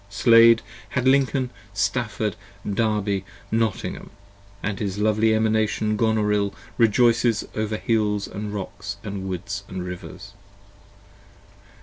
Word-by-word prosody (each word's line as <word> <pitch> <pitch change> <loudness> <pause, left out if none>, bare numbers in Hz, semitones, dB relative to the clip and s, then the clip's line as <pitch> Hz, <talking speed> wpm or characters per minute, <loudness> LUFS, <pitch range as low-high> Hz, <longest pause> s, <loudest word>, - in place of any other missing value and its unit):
Slade 115 +1 +6 0.3
had 130 0 +1
Lincoln, 130 -1 +2 0.2
Stafford, 110 -1 -1 0.3
Derby, 105 -2 0 0.3
Nottingham, 110 -2 -1 0.3
& 100 0 -27
his 100 -1 -2
lovely 110 +1 +2
35 110 - +4
Emanation 110 -1 +1
Gonorill 105 -2 +1 0.2
rejoices 115 0 +3
over 110 0 -1
hills 105 -3 0
& - - -14
rocks 100 -1 -5
& - - -27
woods 100 -1 -4
& - - -22
rivers. 90 +2 -7
105 Hz, 105 wpm, -23 LUFS, 100-115 Hz, 0.3 s, Slade